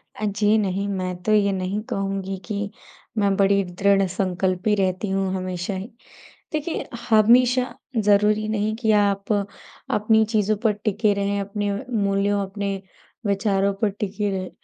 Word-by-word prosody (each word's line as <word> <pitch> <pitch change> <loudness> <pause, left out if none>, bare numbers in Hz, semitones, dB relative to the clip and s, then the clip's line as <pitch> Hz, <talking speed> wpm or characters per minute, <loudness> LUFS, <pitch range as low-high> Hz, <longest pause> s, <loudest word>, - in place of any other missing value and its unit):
अ, 215 - -3
जी 205 +1 +2
नहीं, 200 -1 -1
मैं 185 -2 -2
तो 215 - 0
ये 200 -1 +4
नहीं 190 +1 -2
कहूँगी 195 -1 -2
कि 205 +1 -3 0.5
मैं 200 -2 +2
बड़ी 200 0 +3
दृढ़ 195 +2 +2
संकल्पी 185 +2 0
रहती 190 0 0
हूँ 195 0 0
हमेशा 185 0 -3
ही। 190 +3 -5 0.7
देखिए 310 +2 -2 0.2
हमेशा 245 +3 +5 0.4
ज़रूरी 210 +1 +3
नहीं 215 0 0
कि 220 -2 0
आप 200 +1 0
अपनी 210 +2 0
चीज़ों 215 -1 +2
पर 220 - +4
टिके 210 0 +2
रहें, 200 0 -1
अपने 205 0 -2 0.3
मूल्यों, 200 +1 +1
अपने 195 -1 -4 0.4
विचारों 200 -1 +1
पर 215 - +3
टिके 205 +1 -3
रहें। 185 -1 -3
200 Hz, 145 wpm, -23 LUFS, 195-210 Hz, 0.7 s, हमेशा